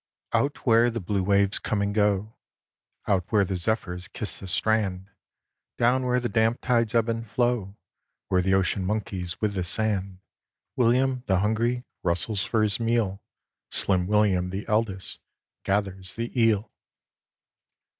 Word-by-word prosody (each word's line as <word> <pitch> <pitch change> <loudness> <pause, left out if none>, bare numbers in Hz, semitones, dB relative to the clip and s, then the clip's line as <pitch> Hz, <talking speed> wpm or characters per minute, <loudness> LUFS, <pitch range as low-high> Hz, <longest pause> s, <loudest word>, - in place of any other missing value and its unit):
Out 140 +1 0
where 115 0 +5
the 115 0 -3
blue 100 0 -1
waves 100 +1 +2
come 110 - -2
and 100 0 0
go, 105 0 +1 0.7
Out 95 -3 +1
where 105 -3 +4
the 95 - -3
zephyrs 90 -1 -2
kiss 105 - -2
the 95 - -8
strand, 100 -1 0 0.7
Down 125 +2 +2
where 125 0 +2
the 120 - -2
damp 115 +1 +1
tides 115 -2 +1
ebb 115 -1 +3
and 115 0 -2
flow, 120 -5 -1 0.5
Where 90 -1 +2
the 95 +1 +2
ocean 95 0 +1
monkeys 95 -4 -3
with 105 -2 0
the 95 -2 -2
sand, 100 0 0 0.6
William, 125 +2 +2
the 95 - +3
hungry, 115 +4 0 0.2
rustles 90 +4 0
for 110 -2 +1
his 105 +1 0
meal, 115 -4 0 0.5
Slim 90 -2 +1
William, 100 -3 +2
the 95 +3 -5
eldest, 105 -4 -1 0.4
gathers 95 -2 0
the 115 +1 -4
eel. 115 -3 +2
105 Hz, 145 wpm, -26 LUFS, 95-115 Hz, 0.7 s, where